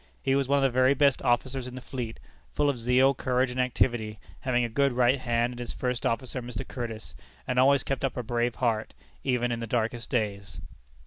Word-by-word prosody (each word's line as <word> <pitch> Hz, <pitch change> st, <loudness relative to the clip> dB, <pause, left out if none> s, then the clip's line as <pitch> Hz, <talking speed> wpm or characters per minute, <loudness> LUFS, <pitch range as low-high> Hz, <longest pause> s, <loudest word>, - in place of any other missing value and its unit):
He 135 Hz, -, +2 dB
was 135 Hz, -1 st, +2 dB
one 140 Hz, +1 st, +3 dB
of 140 Hz, -, +2 dB
the 135 Hz, -, +3 dB
very 130 Hz, +2 st, +5 dB
best 140 Hz, -1 st, +3 dB
officers 125 Hz, +1 st, 0 dB
in 125 Hz, -, -8 dB
the -, -, -5 dB
fleet, 120 Hz, -3 st, -6 dB, 0.4 s
full 145 Hz, -1 st, +3 dB
of 125 Hz, -, -7 dB
zeal, 125 Hz, +3 st, +4 dB
courage, 125 Hz, -1 st, 0 dB
and 125 Hz, -, -4 dB
activity 120 Hz, -3 st, 0 dB, 0.2 s
(having 125 Hz, -2 st, +1 dB
a -, -, +1 dB
good 140 Hz, +3 st, +1 dB
right 125 Hz, +2 st, +3 dB
hand 120 Hz, 0 st, 0 dB
in -, -, -10 dB
his 120 Hz, -, -5 dB
first 125 Hz, -1 st, -1 dB
officer, 125 Hz, +2 st, -2 dB
Mr. 120 Hz, -3 st, -6 dB
Curtis), 115 Hz, -3 st, -6 dB, 0.3 s
and 125 Hz, 0 st, 0 dB
always 140 Hz, +1 st, +5 dB
kept 135 Hz, 0 st, -3 dB
up 135 Hz, -1 st, -1 dB
a 125 Hz, -, -2 dB
brave 120 Hz, 0 st, -1 dB
heart, 110 Hz, -, -1 dB, 0.3 s
even 125 Hz, -2 st, +1 dB
in 120 Hz, -, -2 dB
the 115 Hz, -, -4 dB
darkest 115 Hz, +1 st, -1 dB
days. 100 Hz, -5 st, -2 dB
125 Hz, 215 wpm, -28 LUFS, 120-130 Hz, 0.4 s, very